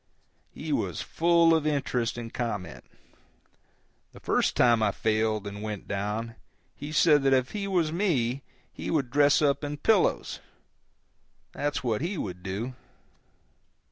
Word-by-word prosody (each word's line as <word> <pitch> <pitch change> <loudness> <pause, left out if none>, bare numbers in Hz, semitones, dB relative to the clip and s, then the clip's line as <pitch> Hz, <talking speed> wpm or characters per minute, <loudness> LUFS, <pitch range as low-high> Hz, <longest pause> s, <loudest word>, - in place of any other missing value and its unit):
He - - -5
was - - -2
full 170 0 +3
of 160 -2 +1
interest 125 -6 -1
and 115 -1 -7
comment. 105 -9 -4 1.3
The - - -12
first - - +1
time 120 -2 +4
I 110 - +3
failed 110 0 0
and 100 0 -6
went 105 -2 -5
down 105 +4 -3 0.4
he 145 +2 -7
said 155 -1 +5
that 135 0 +3
if 130 -1 +1
he 205 -2 -3
was 175 -5 +1
me 140 - 0 0.3
he - - -6
would 140 -7 0
dress 145 +1 +4
up 140 0 +2
in 145 0 -4
pillows, 205 +6 +1 1.1
that's 145 0 -2
what 115 -2 0
he 175 +4 -2
would 90 - -5
do. 100 +7 -4
130 Hz, 140 wpm, -27 LUFS, 110-155 Hz, 1.3 s, said